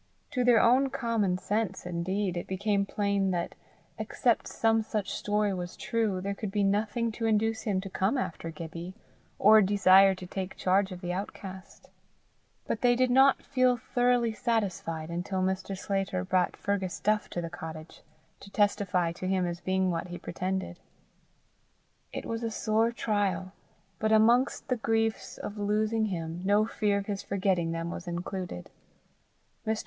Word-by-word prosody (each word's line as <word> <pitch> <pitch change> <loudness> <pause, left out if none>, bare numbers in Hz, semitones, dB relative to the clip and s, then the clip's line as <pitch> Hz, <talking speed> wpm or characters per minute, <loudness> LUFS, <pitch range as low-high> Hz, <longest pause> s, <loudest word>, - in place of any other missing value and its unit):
To 250 - 0
their 240 -2 +6
own 260 +3 +4
common 230 -8 0
sense 210 +1 -2
indeed 180 +2 -2
it 175 - -4
became 200 +1 0
plain 200 -2 0
that, 175 -2 -2 0.5
except - - +1
some 225 0 +2
such 215 -3 -3
story 210 -1 0
was 180 -1 -5
true, 220 -5 0
there 200 +1 -2
could 205 +1 -5
be 205 +1 0
nothing 215 +3 +1
to 225 +1 -2
induce 220 +1 +1
him 205 -4 0
to 195 - -7
come 195 +6 0
after 165 -8 -3
Gibbie, 165 +3 -7 0.4
or 215 +2 +7
desire 195 -1 +6
to 185 - -9
take 190 +1 -5
charge 190 +1 +2
of 180 -1 -7
the 175 -1 -3
outcast; 190 0 -8 0.7
but 220 - -2
they 245 -1 +4
did 255 0 +2
not 270 +2 +5
feel 255 -2 +2
thoroughly 245 -1 +1
satisfied 185 -9 -2
until 185 +2 -2
Mr. 190 +1 -2
Sclater 195 -1 -1
brought 185 -1 +1
Fergus 195 -3 -2
Duff 215 0 +1
to - - -4
the 165 -1 -4
cottage, 160 -2 -8 0.4
to 200 - -12
testify 200 -4 +1
to 185 +2 -5
him 185 -1 +1
as 175 0 -4
being 190 0 +1
what 170 +1 -3
he 175 0 -6
pretended. 185 0 -4 1.3
It - - -5
was 225 0 -3
a 230 - -1
sore 220 +1 +1
trial, 205 -5 -1 0.5
but 215 0 +1
amongst 235 +4 +4
the 250 - 0
griefs 225 0 -1
of 205 +1 -6
losing 215 +2 +1
him, 170 -3 -4
no 205 +2 +3
fear 210 -2 0
of 200 - -3
his 200 -1 -3
forgetting 185 -4 0
them 165 +1 -3
was 175 - -7
included. 175 - -5 1.0
Mr. 220 0 +1
200 Hz, 165 wpm, -29 LUFS, 185-220 Hz, 1.3 s, or